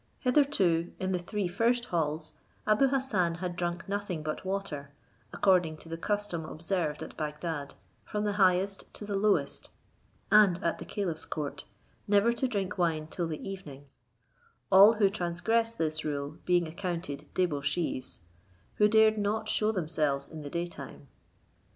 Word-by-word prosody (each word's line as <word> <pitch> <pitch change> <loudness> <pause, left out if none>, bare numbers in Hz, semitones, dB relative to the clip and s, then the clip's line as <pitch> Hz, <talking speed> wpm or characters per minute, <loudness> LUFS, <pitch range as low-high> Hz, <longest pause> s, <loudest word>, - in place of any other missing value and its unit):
Hitherto, 225 - +2
in 190 0 -1
the 180 - 0
three 195 +2 -2
first 235 +6 +1
halls, 155 -1 -1 0.3
Abou 215 +6 +4
Hassan 230 -11 +1
had 175 0 -4
drunk 175 0 -3
nothing 200 -5 -3
but 155 0 -3
water, 190 -7 -3 0.4
according 180 -5 +3
to 165 - -13
the 165 - -3
custom 205 -3 -1
observed 160 -1 -2
at - - -9
Bagdad, 150 -1 -4 0.3
from 210 -1 -3
the 210 - +1
highest 190 +1 +2
to 210 - -7
the 205 - -4
lowest 205 +1 +1 0.6
and 210 -5 +6
at 170 - 0
the - - -7
caliph's 175 -6 -3
court, 150 -3 -4 0.4
never 205 +3 +4
to 260 +2 0
drink 200 -5 -3
wine 160 -3 +1
till 175 -2 -2
the 155 -2 -5
evening; 150 -8 -8 0.9
all 200 +4 +9
who 210 -3 +4
transgress 210 +5 0
this 155 -4 -1
rule 145 0 -3
being 175 -2 +3
accounted 170 -4 -4
debauchees, 145 - -1 0.6
who 210 - +6
dare 220 0 +5
not 215 +1 -1
shew 215 0 +2
themselves 155 -7 0
in 160 -1 -8
the 145 - -6
day 170 +3 -1
time. 140 -4 -10
180 Hz, 150 wpm, -30 LUFS, 160-205 Hz, 0.9 s, all